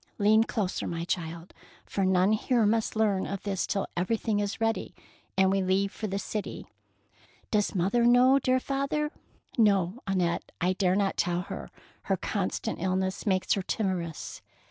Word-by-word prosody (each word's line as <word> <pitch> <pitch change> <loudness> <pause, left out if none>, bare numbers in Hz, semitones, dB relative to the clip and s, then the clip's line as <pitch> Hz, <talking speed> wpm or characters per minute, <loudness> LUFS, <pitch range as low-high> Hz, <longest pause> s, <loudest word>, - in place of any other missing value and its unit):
" - - -40
Lean 215 +2 +5
closer, 205 -4 -2
my 165 -1 -3
child, 170 -1 -4 0.3
for 195 - -2
none 185 +1 +3
here 230 +1 +2
must 220 +2 +1
learn 210 -3 +1
of 195 -1 -5
this 195 -3 -1
till 195 - 0
everything 210 +3 0
is 205 0 -2
ready 225 0 -1 0.4
and 190 0 +4
we 195 0 +2
leave 190 +1 +1
for 215 - -5
the 195 0 -2
city.'' 210 +1 -4 0.5
" - - -31
Does 210 -1 +1
mother 195 +7 +2
know, 250 +3 +6
dear 255 -1 +2
father? 275 +3 -1 0.3
" - - -41
No, 200 -1 +3
Annette, 180 -3 0
I 180 +2 +2
dare 185 -1 +2
not 200 -1 +1
tell 175 0 +1
her; 65 - -7 0.4
her - - +1
constant - - -2
illness 190 +2 -1
makes 185 -2 +2
her 195 - 0
timorous." 185 -5 -3
195 Hz, 170 wpm, -28 LUFS, 185-220 Hz, 0.5 s, know